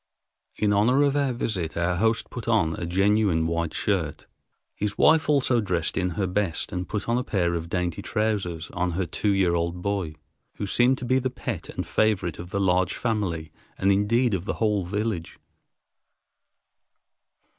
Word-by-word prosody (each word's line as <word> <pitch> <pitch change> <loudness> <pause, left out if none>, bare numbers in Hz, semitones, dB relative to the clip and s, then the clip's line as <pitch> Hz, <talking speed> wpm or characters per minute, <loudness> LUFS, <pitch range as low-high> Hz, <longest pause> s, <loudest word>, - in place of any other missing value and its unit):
In 105 -1 +1
honor 125 +8 +4
of 140 -1 +2
our 140 -2 +2
visit, 95 -10 -3
our 85 +1 +1
host 110 +3 +1
put 120 - -7
on 100 -9 +2
a 85 - -4
genuine 95 -2 +2
white 85 0 -1
shirt. 90 -8 -1 0.5
His 105 0 -3
wife 160 0 +4
also 130 -5 +3
dressed 90 -5 -1
in 90 -1 0
her 100 - +1
best 95 -2 -1
and 90 0 -4
put 105 -1 -3
a 120 +2 +1
pair 90 -7 0
of 85 -1 -3
dainty 90 -2 -2
trousers 100 -7 -2
on 90 -1 -1
her 95 +2 -1
two 95 +5 -1
year 95 -3 +2
old 85 +1 -1
boy, 100 -6 -2 0.4
who 105 - -3
seemed 125 +6 +3
to 125 - -6
be 130 +2 +3
the 130 0 -1
pet 120 -7 -5
and - - -4
favorite 100 -7 0
of 85 +1 -7
the 100 +1 -2
large 95 -1 +2
family 95 -9 -2 0.3
and 95 +1 +3
indeed 110 +4 +2
of 95 -1 -2
the - - -1
whole 105 -4 +1
village. 100 -2 -3
100 Hz, 175 wpm, -25 LUFS, 85-110 Hz, 0.5 s, honor